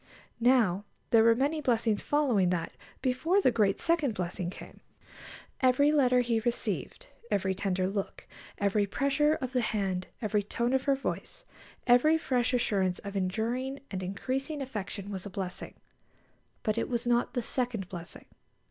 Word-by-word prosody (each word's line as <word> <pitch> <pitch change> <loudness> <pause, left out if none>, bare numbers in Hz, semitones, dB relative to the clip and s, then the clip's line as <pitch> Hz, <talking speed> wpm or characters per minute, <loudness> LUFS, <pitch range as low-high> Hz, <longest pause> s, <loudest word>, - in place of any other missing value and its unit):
Now, 230 -6 +3 0.3
there 225 -1 +6
were 230 0 +6
many 290 +5 0
blessings 230 -5 +1
following 250 -11 +2
that 170 -2 -2 0.3
before 265 +9 +2
the 260 - +4
great 210 -4 +2
second 310 -9 +1
blessing 180 -1 -3
came. - - -11 0.8
Every 270 +3 +4
letter 255 -4 +4
he 235 -2 +1
received, 240 - -3 0.2
every 190 -1 +1
tender 185 -1 -1
look, 195 0 -4 0.3
every 200 0 +1
pressure 280 +7 +2
of 255 -3 -5
the 250 - +2
hand, 195 -5 -1
every 210 -2 0
tone 235 +5 -1
of 265 - +1
her 280 -1 +3
voice, - - -5 0.4
every 260 +6 +5
fresh 250 -6 0
assurance 195 -7 +1
of 200 0 -8
enduring 230 +8 -1
and 190 -2 -3
increasing 260 - -3
affection 210 -6 -5
was 195 0 -5
a - - -7
blessing; 190 -3 -5 0.9
but 215 0 0
it - - -2
was 240 -1 -1
not 240 +2 +1
the 245 - 0
second 240 -6 -1
blessing. 175 -1 -9
235 Hz, 155 wpm, -29 LUFS, 195-265 Hz, 0.9 s, there